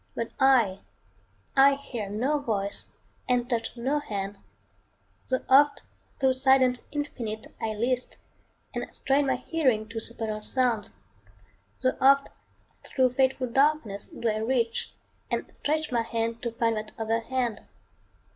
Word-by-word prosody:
But 230 Hz, -1 st, -3 dB
I 245 Hz, -8 st, +4 dB, 0.8 s
I 275 Hz, +1 st, +7 dB
hear 240 Hz, -7 st, -6 dB
no 255 Hz, +9 st, 0 dB
voice 205 Hz, -7 st, -2 dB, 0.4 s
and 245 Hz, -1 st, +2 dB
touch 235 Hz, -1 st, -2 dB
no 270 Hz, +5 st, 0 dB
hand, 200 Hz, -6 st, -5 dB, 0.9 s
Tho' 260 Hz, 0 st, 0 dB
oft 285 Hz, +2 st, +5 dB, 0.4 s
thro' 265 Hz, -1 st, +4 dB
silence 260 Hz, -1 st, +3 dB
infinite, 240 Hz, -7 st, -5 dB
I 220 Hz, -1 st, -1 dB
list, 245 Hz, +3 st, 0 dB, 0.6 s
And -, -, -4 dB
strain 275 Hz, +1 st, +2 dB
my -, -, +2 dB
hearing 255 Hz, -10 st, 0 dB
to 230 Hz, 0 st, -4 dB
supernal 220 Hz, -1 st, -4 dB
sounds; 230 Hz, -2 st, +1 dB, 0.9 s
Tho' 255 Hz, -, +2 dB
oft 275 Hz, +1 st, +5 dB, 0.5 s
thro' 260 Hz, -2 st, +2 dB
fateful 260 Hz, +1 st, +1 dB
darkness 255 Hz, -5 st, +1 dB
do 235 Hz, -, -4 dB
I 215 Hz, -1 st, +1 dB
reach, 230 Hz, 0 st, 0 dB, 0.4 s
And -, -, -1 dB
stretch 310 Hz, 0 st, -1 dB
my 235 Hz, -1 st, +2 dB
hand 230 Hz, 0 st, -2 dB
to 235 Hz, -, -2 dB
find 230 Hz, -1 st, 0 dB
that 215 Hz, 0 st, -6 dB
other 225 Hz, 0 st, 0 dB
hand. 240 Hz, -1 st, -2 dB
245 Hz, 135 wpm, -27 LUFS, 225-270 Hz, 0.9 s, I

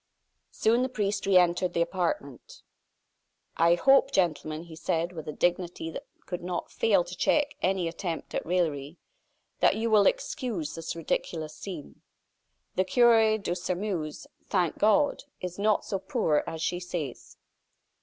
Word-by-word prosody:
Soon 230 Hz, +3 st, +2 dB
the 260 Hz, -, 0 dB
priest 205 Hz, -4 st, -2 dB
re 195 Hz, -2 st, +6 dB
entered 175 Hz, 0 st, +3 dB
the 170 Hz, -, +2 dB
apartment. 170 Hz, -7 st, -4 dB, 0.9 s
"I 170 Hz, +1 st, +4 dB
hope, 270 Hz, +7 st, +5 dB
gentlemen," 155 Hz, -, 0 dB
he 170 Hz, -2 st, -11 dB
said, 165 Hz, +2 st, -1 dB
with 160 Hz, -4 st, -8 dB
a -, -, -2 dB
dignity 175 Hz, 0 st, -1 dB
that -, -, -8 dB, 0.2 s
could 180 Hz, -, -5 dB
not 175 Hz, 0 st, -4 dB
fail 465 Hz, +1 st, +3 dB
to -, -, -8 dB
check 295 Hz, -1 st, +2 dB
any 185 Hz, -2 st, +1 dB
attempt 165 Hz, 0 st, -5 dB
at -, -, -1 dB
raillery, 160 Hz, -3 st, -1 dB, 0.6 s
"that -, -, +4 dB
you 225 Hz, +1 st, -1 dB
will 210 Hz, -2 st, +6 dB
excuse 250 Hz, -, -2 dB
this 165 Hz, 0 st, -5 dB
ridiculous 160 Hz, -1 st, -3 dB
scene. 175 Hz, -7 st, -9 dB, 0.7 s
The 185 Hz, -, +3 dB
cure 225 Hz, +1 st, +5 dB
of 215 Hz, -, -7 dB
Sairmeuse, 180 Hz, -3 st, -3 dB, 0.2 s
thank 180 Hz, -5 st, 0 dB
God! 285 Hz, +8 st, +3 dB
is 180 Hz, +1 st, -6 dB
not 210 Hz, 0 st, +2 dB
so 195 Hz, -, -2 dB
poor 160 Hz, -5 st, +1 dB
as 160 Hz, 0 st, -4 dB
she 175 Hz, +1 st, -1 dB
says." 170 Hz, -7 st, -6 dB
180 Hz, 150 wpm, -28 LUFS, 165-210 Hz, 0.9 s, re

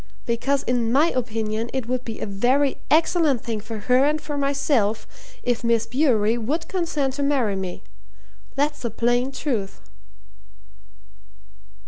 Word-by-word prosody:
because 265 Hz, +4 st, 0 dB
in 240 Hz, -2 st, 0 dB
my 300 Hz, +6 st, +4 dB
opinion 225 Hz, -2 st, -2 dB
it 265 Hz, -3 st, -2 dB
would 255 Hz, 0 st, -1 dB
be 225 Hz, -3 st, -6 dB
a -, -, -3 dB
very 250 Hz, +8 st, +1 dB
excellent 315 Hz, -5 st, +3 dB
thing 225 Hz, -3 st, -3 dB
for 220 Hz, 0 st, -7 dB
her 250 Hz, +4 st, +4 dB
and 300 Hz, +2 st, +2 dB
for 295 Hz, -1 st, -5 dB
myself 275 Hz, -6 st, +1 dB, 0.4 s
if 245 Hz, -1 st, 0 dB
Miss 230 Hz, -1 st, +2 dB
Bewery 240 Hz, -5 st, +2 dB
would 295 Hz, +9 st, -2 dB
consent 325 Hz, -8 st, -1 dB
to 285 Hz, -, -4 dB
marry 270 Hz, -8 st, +1 dB
me. 190 Hz, -2 st, -5 dB, 0.7 s
That's 295 Hz, +2 st, 0 dB
the 235 Hz, -, -2 dB
plain 240 Hz, +4 st, +1 dB
truth." 240 Hz, -8 st, -3 dB
250 Hz, 140 wpm, -23 LUFS, 225-280 Hz, 0.7 s, my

